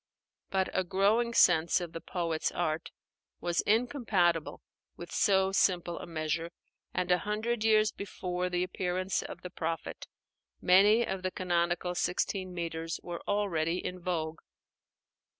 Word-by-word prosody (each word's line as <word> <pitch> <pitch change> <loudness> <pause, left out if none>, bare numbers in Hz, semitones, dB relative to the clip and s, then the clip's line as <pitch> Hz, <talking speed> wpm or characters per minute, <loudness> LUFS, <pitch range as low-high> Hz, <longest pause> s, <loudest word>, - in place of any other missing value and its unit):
But 190 -1 +1
a 185 - +1
growing 205 +6 +2
sense 170 -1 +5
of 175 -2 -5
the 165 - -6
poet's 165 -3 -2
art 160 -2 -2 0.5
was 175 -1 0
incompatible 210 - +1 0.3
with - - -9
so 190 -2 +3
simple 175 -3 +1
a - - -8
measure; 165 0 -2 0.4
and 180 0 -1
a 180 - +4
hundred 215 +2 -2
years 215 -1 +4
before 180 -2 -4
the 180 0 0
appearance 185 +1 -1
of - - -8
the 180 - -6
Prophet, 165 -3 -4 0.5
many 205 +6 +5
of 190 -1 -3
the 185 - -1
canonical 175 -1 0
sixteen 185 +1 -1
metres 165 -1 -4
were 175 -1 -6
already 180 -5 0
in 180 0 -5
vogue. 165 -2 -2
180 Hz, 135 wpm, -30 LUFS, 170-195 Hz, 0.5 s, sense